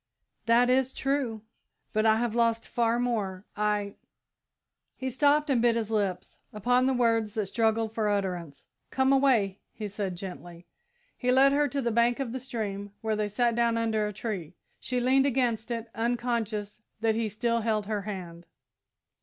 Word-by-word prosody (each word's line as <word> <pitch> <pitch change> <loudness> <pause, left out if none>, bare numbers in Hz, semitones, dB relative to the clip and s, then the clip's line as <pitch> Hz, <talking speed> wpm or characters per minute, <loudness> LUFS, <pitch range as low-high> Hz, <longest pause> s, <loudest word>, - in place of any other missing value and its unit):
"That 235 +2 +5
is 260 +1 +2
true, 265 -6 -1 0.5
but 215 +1 +2
I 220 - +5
have 230 0 -1
lost 230 -1 +1
far 235 0 +1
more. 210 -6 -2
I 210 -1 -1 0.5
" - - -60 0.3
He 260 0 -4
stopped 290 +3 +3
and 245 -4 +3
bit 235 -1 +3
his 225 -2 -2
lips 195 -4 -2
upon 245 +5 +2
the 265 - +2
words 230 -3 +1
that 215 -2 0
struggled 225 +1 0
for 220 -2 0
utterance. 180 -7 -3 0.2
"Come 265 +1 +2
away," 235 -8 +3 0.2
he 215 -1 -4
said, 200 -2 -4
gently. 175 -2 -9 0.5
He 250 0 0
led 270 +2 +6
her 290 +1 +3
to 275 0 -2
the 235 - 0
bank 235 +3 +2
of 265 -4 -2
the 260 - -4
stream, 205 -6 -5
where 220 -1 0
they 210 -1 -1
sat 235 +3 +1
down 235 0 +2
under 220 -2 0
a - - -4
tree. 190 -6 -5 0.2
She 250 -1 -2
leaned 265 +2 +3
against 240 -4 0
it, 230 -1 -4
unconscious 225 -3 -2 0.2
that 225 -1 +2
he 225 0 -1
still 230 +2 0
held 215 -2 0
her 210 0 -2
hand. 175 -4 -7
225 Hz, 175 wpm, -28 LUFS, 210-245 Hz, 0.5 s, led